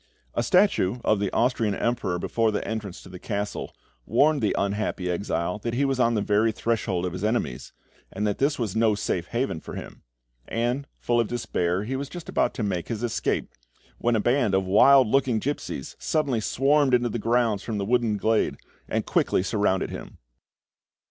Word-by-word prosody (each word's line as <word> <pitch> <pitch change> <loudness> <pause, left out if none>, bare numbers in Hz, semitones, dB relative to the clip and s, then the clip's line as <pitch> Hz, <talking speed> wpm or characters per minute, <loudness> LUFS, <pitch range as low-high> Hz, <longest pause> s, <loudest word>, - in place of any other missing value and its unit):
A - - 0
statue 125 - +3
of 110 - +3
the 100 -2 -1
Austrian 115 -3 +1
emperor 115 -7 -1
before 115 +5 0
the 105 - -2
entrance 105 -4 -5
to - - -12
the 90 -1 -9
castle 105 0 -4 0.3
warned 150 -1 +3
the 105 - +1
unhappy 100 -2 -1
exile 90 +1 -2
that 115 +2 -3
he 140 +3 +2
was 135 -1 0
on 115 -1 +3
the 105 - 0
very 105 +2 +2
threshold 105 -5 -1
of 90 - -3
his 90 +2 -5
enemies, 110 - -1 0.4
and 105 +2 -2
that 105 -1 -1
this 140 +2 +2
was 110 -5 -2
no 110 -1 +3
safe 90 -4 -2
haven 120 -8 -2
for - - -9
him; - - -9 0.5
and, 120 +5 -1
full 120 0 +1
of 115 - +2
despair, 95 -6 -1
he 125 +5 -3
was 140 +1 -4
just 175 -2 -8
about - - 0
to 120 - -2
make 90 -4 -2
his 115 -1 -4
escape, 120 - -1 0.5
when 120 0 +2
a - - +2
band 120 -2 +2
of 95 0 +1
wild 130 +8 +6
looking 130 0 +2
gipsies 125 - -4
suddenly 145 -7 0
swarmed 135 +3 +3
into 120 0 +1
the 115 - -3
grounds 115 -2 +1
from 110 -3 -4
the 100 - -2
woodland 115 -2 +1
glade, 110 +2 +1 0.3
and - - -1
quickly - - +1
surrounded 100 -2 0
him. - - -8
110 Hz, 190 wpm, -25 LUFS, 100-125 Hz, 0.5 s, wild